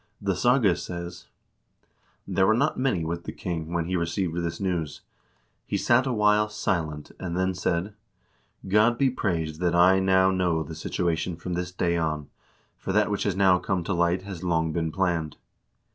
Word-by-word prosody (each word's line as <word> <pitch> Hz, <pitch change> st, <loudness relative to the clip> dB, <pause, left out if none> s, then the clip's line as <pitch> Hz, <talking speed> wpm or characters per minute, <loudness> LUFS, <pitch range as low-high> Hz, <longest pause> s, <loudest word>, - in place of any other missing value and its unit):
The 100 Hz, -2 st, -1 dB
saga 120 Hz, -2 st, +3 dB
says: 90 Hz, +1 st, -7 dB, 1.0 s
"There 95 Hz, -1 st, +2 dB
were 110 Hz, -, +4 dB
not 140 Hz, +6 st, +1 dB
many 115 Hz, -11 st, 0 dB
with 85 Hz, +1 st, -4 dB
the -, -, -4 dB
king 80 Hz, -2 st, -5 dB
when 85 Hz, -1 st, -1 dB
he 90 Hz, +2 st, -2 dB
received 85 Hz, 0 st, -1 dB
this 85 Hz, -1 st, -3 dB
news. 85 Hz, -6 st, -2 dB, 0.7 s
He -, -, -1 dB
sat 125 Hz, +3 st, +3 dB
a -, -, 0 dB
while 105 Hz, -1 st, +3 dB
silent 80 Hz, -8 st, -2 dB
and 90 Hz, -1 st, -4 dB
then 95 Hz, 0 st, +1 dB
said: 90 Hz, +2 st, -1 dB, 0.4 s
' -, -, -19 dB
God 120 Hz, +3 st, +4 dB
be 135 Hz, -1 st, +3 dB
praised 80 Hz, -9 st, -2 dB
that 85 Hz, -1 st, +1 dB
I 90 Hz, +2 st, +6 dB
now 95 Hz, 0 st, +4 dB
know 90 Hz, -4 st, +1 dB
the 80 Hz, +2 st, -8 dB
situation 85 Hz, +1 st, -2 dB
from 90 Hz, +2 st, -5 dB
this 90 Hz, 0 st, -3 dB
day 85 Hz, -1 st, 0 dB
on, 75 Hz, -3 st, -2 dB, 0.5 s
for -, -, -4 dB
that 105 Hz, 0 st, +2 dB
which 100 Hz, -, -1 dB
has 100 Hz, -3 st, 0 dB
now 95 Hz, -2 st, +4 dB
come 90 Hz, -1 st, -1 dB
to 95 Hz, -, -2 dB
light 85 Hz, +1 st, +1 dB
has 95 Hz, -3 st, -7 dB
long 80 Hz, -2 st, 0 dB
been 80 Hz, -1 st, -1 dB
planned.' 85 Hz, -4 st, -1 dB
90 Hz, 185 wpm, -26 LUFS, 85-95 Hz, 1.0 s, I